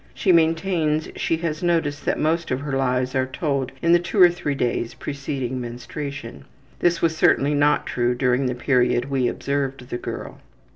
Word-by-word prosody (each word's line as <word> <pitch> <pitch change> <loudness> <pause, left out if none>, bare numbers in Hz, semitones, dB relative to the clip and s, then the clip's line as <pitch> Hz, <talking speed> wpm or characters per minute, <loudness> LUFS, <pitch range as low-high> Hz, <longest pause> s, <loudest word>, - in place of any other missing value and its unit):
She 190 - +2
maintains 165 -2 +2
she 165 - 0
has 155 -1 -2
noticed 160 -4 0
that - - +1
most 165 +2 0
of 130 - -1
her 140 -2 -3
lies 130 -1 0
are 130 -1 +1
told 140 -1 -2
in 170 - +3
the 175 - +6
two 175 +4 -3
or 180 -2 +8
three 150 -5 -3
days 120 -2 -1
preceding 135 -3 -4
menstruation. 120 - -7 0.3
(This 175 -1 +1
was 165 -1 +2
certainly 145 -2 +3
not 145 0 +2
true 120 0 0
during 125 +1 +1
the 125 - -2
period 125 0 +1
we 130 -3 +1
observed 135 -1 -3
the 120 - -2
girl.) - - -7
140 Hz, 180 wpm, -23 LUFS, 125-160 Hz, 0.3 s, or